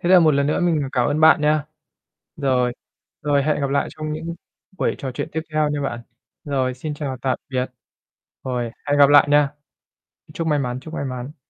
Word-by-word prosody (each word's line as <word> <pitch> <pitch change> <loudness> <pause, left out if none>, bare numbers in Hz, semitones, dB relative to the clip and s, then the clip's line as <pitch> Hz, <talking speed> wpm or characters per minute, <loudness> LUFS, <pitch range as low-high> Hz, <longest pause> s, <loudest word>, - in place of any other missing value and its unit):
Thế 175 - -1
là 185 -1 +8
một 155 -3 +4
lần 140 0 +2
nữa 150 - +1
mình 160 -6 +1
cảm 125 -2 +2
ơn 150 +2 0
bạn 155 -2 +7
nha. 150 0 +2 0.7
Rồi. 130 -4 +1 0.5
Rồi, 145 -1 +2
hẹn 150 0 0
gặp 140 -1 -1
lại 140 0 +1
trong 155 -1 -5
những 165 +2 -5 0.4
buổi - - +1
trò 130 -3 -4
chuyện - - -4
tiếp 160 - -1
theo 155 -1 +2
nha 145 -1 -2
bạn. 125 -4 -3 0.4
Rồi, 130 -3 -1
xin 150 +3 -5
chào 140 -3 -4
tạm 130 -1 0
biệt. 130 -1 -1 0.8
Rồi, 125 -2 -1 0.2
hẹn 145 0 +2
gặp 140 -1 +8
lại 145 0 +7
nha. 145 -1 +4 0.8
Chúc 165 -1 -3
may 150 -2 +2
mắn, 125 -1 -2
chúc 155 +3 -11
may 140 - -3
mắn. 130 +3 -6
145 Hz, 210 wpm, -22 LUFS, 130-155 Hz, 0.8 s, là